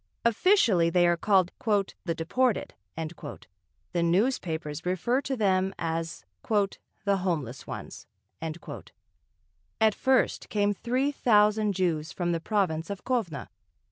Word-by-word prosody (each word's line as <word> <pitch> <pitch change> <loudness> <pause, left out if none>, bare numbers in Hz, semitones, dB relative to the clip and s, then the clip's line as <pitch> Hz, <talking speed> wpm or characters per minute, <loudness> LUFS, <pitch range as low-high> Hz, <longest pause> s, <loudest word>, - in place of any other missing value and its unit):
Officially 230 - +4
they 175 +1 +4
are 175 0 +4
called 185 0 +2 0.5
"the 165 -3 -1
deported"; 225 +9 0 1.2
the 175 - +1
newspapers 170 - 0
refer 185 +9 +1
to 270 -1 -2
them 190 -2 +2
as 165 0 -3 0.2
"the 200 -1 0
homeless 155 -10 -3
ones." - - -8 1.7
At 220 -1 +4
first 265 +4 +1
came 205 -1 +2
three 255 +7 0
thousand 210 -5 +3
Jews 170 -4 0
from 175 -1 -1
the 165 - 0
province 170 -4 0
of 200 -2 -5
Kovno. 225 - -2
190 Hz, 110 wpm, -28 LUFS, 170-220 Hz, 1.7 s, Officially